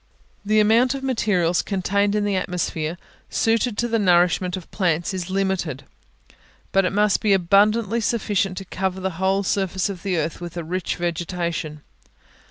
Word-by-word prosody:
The 215 Hz, +1 st, +2 dB
amount 230 Hz, +5 st, +4 dB
of 270 Hz, -, -6 dB
materials 185 Hz, -10 st, +1 dB
contained 200 Hz, +1 st, 0 dB
in 210 Hz, -, +1 dB
the 205 Hz, -1 st, 0 dB
atmosphere, 175 Hz, -3 st, -2 dB, 0.3 s
suited 225 Hz, 0 st, +1 dB
to 240 Hz, -, +1 dB
the 230 Hz, -1 st, 0 dB
nourishment 180 Hz, -1 st, +3 dB
of 180 Hz, -, -11 dB
plants, 175 Hz, -3 st, 0 dB
is 185 Hz, -1 st, -4 dB
limited; 190 Hz, -7 st, -1 dB, 0.9 s
but 195 Hz, -1 st, +3 dB
it -, -, 0 dB
must 210 Hz, 0 st, +2 dB
be 210 Hz, -2 st, +3 dB
abundantly 205 Hz, +5 st, +3 dB
sufficient 205 Hz, -4 st, 0 dB
to 195 Hz, -, -5 dB
cover 190 Hz, 0 st, -3 dB
the 190 Hz, 0 st, -2 dB
whole 195 Hz, +1 st, +2 dB
surface 190 Hz, -1 st, 0 dB
of 190 Hz, -4 st, -6 dB
the 185 Hz, -2 st, -1 dB
earth 160 Hz, +2 st, -2 dB
with 175 Hz, 0 st, -7 dB
a 170 Hz, -, -3 dB
rich 180 Hz, +2 st, -3 dB
vegetation. 170 Hz, -2 st, -3 dB
190 Hz, 165 wpm, -22 LUFS, 175-205 Hz, 0.9 s, amount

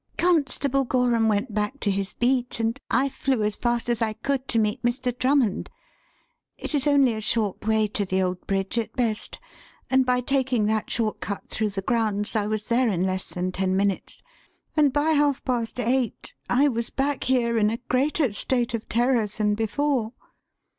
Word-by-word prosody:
"Constable 280 Hz, -5 st, +2 dB
Gorham 245 Hz, -3 st, +2 dB
went 215 Hz, +2 st, 0 dB
back 210 Hz, +6 st, -2 dB
to 205 Hz, -, +1 dB
his 195 Hz, 0 st, -3 dB
beat, 245 Hz, -1 st, 0 dB
and 225 Hz, +1 st, -1 dB
I 270 Hz, +2 st, +2 dB
flew 265 Hz, -4 st, -1 dB
as 210 Hz, 0 st, 0 dB
fast 240 Hz, -1 st, -1 dB
as 235 Hz, -2 st, 0 dB
I 220 Hz, -1 st, +1 dB
could 265 Hz, +4 st, -2 dB
to 230 Hz, -, 0 dB
meet 210 Hz, -1 st, +1 dB
Mr. 240 Hz, 0 st, -1 dB
Drummond. 255 Hz, -5 st, +1 dB, 0.9 s
It -, -, -6 dB
is 290 Hz, -1 st, +1 dB
only 280 Hz, -4 st, +4 dB
a 220 Hz, -, -4 dB
short 215 Hz, -2 st, -1 dB
way 220 Hz, -1 st, +3 dB
to 205 Hz, -, -1 dB
the 190 Hz, -1 st, -1 dB
old 185 Hz, -1 st, -2 dB
bridge 195 Hz, +3 st, -1 dB
at 225 Hz, -, -4 dB
best, 230 Hz, -4 st, -1 dB, 0.5 s
and 260 Hz, 0 st, +5 dB
by 250 Hz, 0 st, +1 dB
taking 255 Hz, -4 st, +1 dB
that 215 Hz, 0 st, 0 dB
short 220 Hz, -2 st, -1 dB
cut 200 Hz, -, -5 dB
through 215 Hz, -1 st, -1 dB
the 195 Hz, -1 st, -5 dB
grounds, 215 Hz, -2 st, 0 dB
I 210 Hz, -1 st, +1 dB
was 215 Hz, -1 st, -3 dB
there 240 Hz, 0 st, +2 dB
in 180 Hz, -3 st, 0 dB
less 185 Hz, 0 st, -2 dB
than 180 Hz, +1 st, -3 dB
ten 185 Hz, 0 st, 0 dB
minutes. 200 Hz, -1 st, -2 dB, 0.5 s
And 295 Hz, -3 st, +4 dB
by 295 Hz, +3 st, +2 dB
half 290 Hz, -3 st, +2 dB
past 245 Hz, -1 st, -2 dB
eight 245 Hz, -1 st, -1 dB, 0.2 s
I 270 Hz, +4 st, +4 dB
was 235 Hz, -3 st, -1 dB
back 275 Hz, 0 st, -1 dB
here 235 Hz, -3 st, +2 dB
in 210 Hz, -1 st, +3 dB
a 225 Hz, -, -2 dB
greater 270 Hz, -1 st, +1 dB
state 240 Hz, +2 st, -1 dB
of 225 Hz, -1 st, -4 dB
terror 240 Hz, -1 st, +2 dB
than 210 Hz, 0 st, 0 dB
before." 225 Hz, +2 st, 0 dB
235 Hz, 190 wpm, -25 LUFS, 210-260 Hz, 0.9 s, and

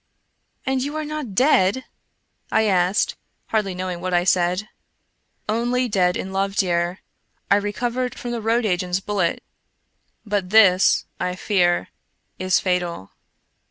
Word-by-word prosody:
" -, -, -45 dB
And 265 Hz, 0 st, 0 dB
you 285 Hz, +3 st, -3 dB
are 310 Hz, 0 st, -3 dB
not 295 Hz, -9 st, -5 dB
dead? 255 Hz, -2 st, +3 dB, 0.3 s
" -, -, -50 dB, 0.3 s
I 220 Hz, -, +3 dB
asked, 185 Hz, 0 st, +2 dB, 0.3 s
hardly 210 Hz, -4 st, 0 dB
knowing 180 Hz, -1 st, -4 dB
what 180 Hz, 0 st, -1 dB
I 175 Hz, -, +3 dB
said. 180 Hz, +2 st, +1 dB, 0.4 s
" -, -, -47 dB, 0.2 s
Only 250 Hz, +1 st, +1 dB
dead 185 Hz, -5 st, +1 dB
in 190 Hz, -, -5 dB
love, 195 Hz, +1 st, -1 dB
dear. 175 Hz, -1 st, 0 dB, 0.5 s
I 200 Hz, -, +7 dB
recovered 240 Hz, +5 st, -2 dB
from 240 Hz, -, -5 dB
the 235 Hz, -1 st, -3 dB
road 225 Hz, +2 st, +1 dB
agent's 180 Hz, -2 st, 0 dB
bullet, 195 Hz, -4 st, -1 dB, 0.8 s
but 205 Hz, -3 st, -1 dB
this, 195 Hz, -3 st, +5 dB
I 180 Hz, 0 st, -2 dB
fear, 175 Hz, -, +1 dB, 0.5 s
is 185 Hz, 0 st, +2 dB
fatal." 175 Hz, -, -2 dB
195 Hz, 145 wpm, -22 LUFS, 180-225 Hz, 0.8 s, I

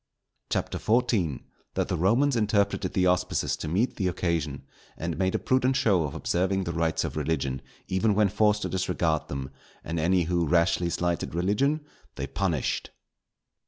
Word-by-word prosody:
CHAPTER -, -, -1 dB
XIV.—_That 110 Hz, -, -1 dB
the -, -, -1 dB
Romans 120 Hz, -, +3 dB
interpreted 105 Hz, -4 st, +1 dB
the 90 Hz, -, +2 dB
Auspices 90 Hz, 0 st, +1 dB
to -, -, -5 dB
meet 100 Hz, +11 st, 0 dB
the 95 Hz, -, 0 dB
occasion; 85 Hz, -6 st, -1 dB, 0.3 s
and 85 Hz, 0 st, -3 dB
made 95 Hz, -1 st, 0 dB
a -, -, +4 dB
prudent 130 Hz, 0 st, +1 dB
show 105 Hz, -, +3 dB
of 70 Hz, -, -5 dB
observing 95 Hz, +2 st, 0 dB
the 85 Hz, -2 st, -3 dB
Rites 80 Hz, -1 st, 0 dB
of -, -, -4 dB
Religion 70 Hz, -3 st, -1 dB, 0.3 s
even 100 Hz, +3 st, +1 dB
when 105 Hz, 0 st, +4 dB
forced 105 Hz, +1 st, +2 dB
to -, -, -2 dB
disregard 90 Hz, -4 st, 0 dB
them; 70 Hz, -1 st, -5 dB, 0.3 s
and 85 Hz, +1 st, -3 dB
any 90 Hz, +2 st, +3 dB
who 85 Hz, 0 st, 0 dB
rashly 85 Hz, +1 st, +2 dB
slighted 85 Hz, -1 st, -1 dB
Religion 105 Hz, -, +1 dB, 0.3 s
they -, -, -3 dB
punished. 85 Hz, -7 st, -1 dB
90 Hz, 160 wpm, -27 LUFS, 85-105 Hz, 0.3 s, a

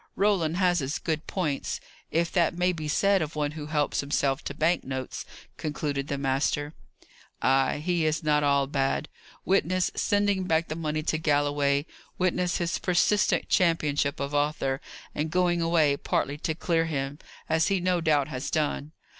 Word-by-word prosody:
Roland 180 Hz, -5 st, +2 dB
has 180 Hz, -2 st, +3 dB
his 140 Hz, +1 st, -2 dB
good 160 Hz, -2 st, -3 dB
points 155 Hz, -8 st, -2 dB, 0.3 s
if 170 Hz, +1 st, 0 dB
that 175 Hz, -2 st, +2 dB
may 180 Hz, +1 st, +2 dB
be 155 Hz, -3 st, -5 dB
said 195 Hz, +5 st, +3 dB
of 155 Hz, 0 st, -4 dB
one 150 Hz, -1 st, -1 dB
who 150 Hz, -1 st, -7 dB
helps 150 Hz, -1 st, 0 dB
himself 140 Hz, -1 st, 0 dB
to 145 Hz, -, -5 dB
bank 165 Hz, +4 st, +1 dB
notes," 130 Hz, -1 st, -5 dB, 0.3 s
concluded 145 Hz, -2 st, -3 dB
the 140 Hz, -, -2 dB
master. 140 Hz, +2 st, 0 dB, 0.7 s
"Ay, 135 Hz, 0 st, +2 dB
he 175 Hz, -2 st, +1 dB
is 155 Hz, 0 st, 0 dB
not 150 Hz, -1 st, +2 dB
all 140 Hz, -1 st, +3 dB
bad. 135 Hz, +2 st, -1 dB, 0.4 s
Witness 185 Hz, -1 st, +2 dB
sending 205 Hz, -2 st, +1 dB
back 165 Hz, -1 st, +1 dB
the 155 Hz, -, -3 dB
money 155 Hz, -1 st, -2 dB
to 155 Hz, 0 st, 0 dB
Galloway; 145 Hz, -1 st, +1 dB, 0.3 s
witness 180 Hz, -1 st, +1 dB
his 170 Hz, +1 st, -1 dB
persistent 185 Hz, +3 st, +2 dB
championship 150 Hz, -5 st, +1 dB
of 140 Hz, +1 st, -3 dB
Arthur; 145 Hz, -2 st, 0 dB, 0.3 s
and 155 Hz, +2 st, -2 dB
going 175 Hz, 0 st, +2 dB
away 165 Hz, -4 st, +3 dB
partly 145 Hz, +1 st, -1 dB
to 160 Hz, 0 st, -2 dB
clear 165 Hz, -1 st, +1 dB
him, 140 Hz, -2 st, -3 dB, 0.3 s
as 160 Hz, 0 st, +2 dB
he 195 Hz, -1 st, +2 dB
no 180 Hz, -1 st, +1 dB
doubt 150 Hz, -4 st, +2 dB
has 130 Hz, -3 st, -4 dB
done! 150 Hz, 0 st, -1 dB
155 Hz, 165 wpm, -27 LUFS, 145-175 Hz, 0.7 s, has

